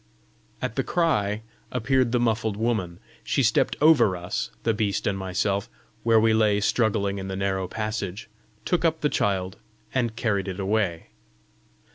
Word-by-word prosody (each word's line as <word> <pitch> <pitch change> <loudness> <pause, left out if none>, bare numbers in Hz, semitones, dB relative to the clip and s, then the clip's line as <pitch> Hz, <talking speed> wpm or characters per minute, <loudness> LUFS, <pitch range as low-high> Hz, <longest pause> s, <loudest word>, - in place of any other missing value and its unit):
At - - -3
the - - +2
cry 110 - 0 0.3
appeared 125 0 +1
the 120 - +2
muffled 110 -3 0
woman. 105 -7 -1 0.2
She - - +1
stepped - - +2
over 145 - +5
us, 90 +1 -3
the 115 - +2
beast 105 -2 -1
and 100 - +1
myself, 95 +1 -1 0.3
where 115 -1 +4
we 110 0 +4
lay 105 -2 +3
struggling 100 -2 +1
in 95 - -5
the 95 - -4
narrow 95 -1 -1
passage, 110 -1 -4 0.4
took 175 -2 +1
up 160 -1 +1
the 150 - +2
child, 95 -5 -1 0.4
and 120 -4 0
carried 100 -5 0
it 95 0 -5
away. 95 -4 -1
105 Hz, 155 wpm, -25 LUFS, 95-115 Hz, 0.4 s, over